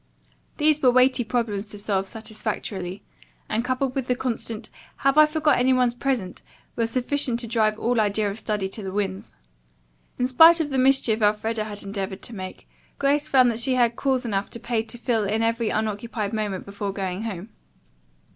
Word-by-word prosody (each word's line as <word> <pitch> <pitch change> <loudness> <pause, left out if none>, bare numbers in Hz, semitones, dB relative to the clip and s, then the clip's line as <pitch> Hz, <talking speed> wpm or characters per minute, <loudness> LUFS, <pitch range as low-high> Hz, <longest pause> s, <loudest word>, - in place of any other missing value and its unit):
These 300 0 +3
were 255 - +5
weighty 255 0 +4
problems 220 -3 -2
to 205 - -8
solve 195 -2 -1
satisfactorily, 215 -3 -5 0.4
and 220 +2 -1
coupled 255 +1 -1
with 265 -2 -3
the 250 - +1
constant, 230 -3 -3 0.3
"Have 275 0 +4
I 305 0 +7
forgotten 305 -3 +2
any 260 +1 +3
one's 250 -2 +2
present?" 245 -7 -2 0.3
were 230 -1 0
sufficient 255 0 0
to 235 - -3
drive 215 -2 +1
all 235 0 +1
idea 210 0 +1
of 205 - -7
study 210 -3 -2
to 215 - -5
the 190 -1 -5
winds. 195 -1 -3 0.9
In 250 - +1
spite 325 +7 +7
of 300 -3 -2
the 265 - +1
mischief 255 -4 +3
Elfreda 215 +1 +1
had 205 -1 -5
endeavored 195 -1 -5
to 235 - -4
make, 185 -1 -8 0.3
Grace 285 +1 +1
found 255 -3 +5
that 225 - -1
she 255 +2 +2
had 240 -2 +2
calls 265 -1 0
enough 200 -3 -2
to 235 - -7
pay 235 -1 -1
to 225 +2 -6
fill 230 -2 0
in 215 +3 0
every 230 0 0
unoccupied 215 0 -2
moment 210 -4 -3
before 200 0 -4
going 190 -1 -4
home. 210 -2 -5
225 Hz, 185 wpm, -24 LUFS, 205-255 Hz, 0.9 s, I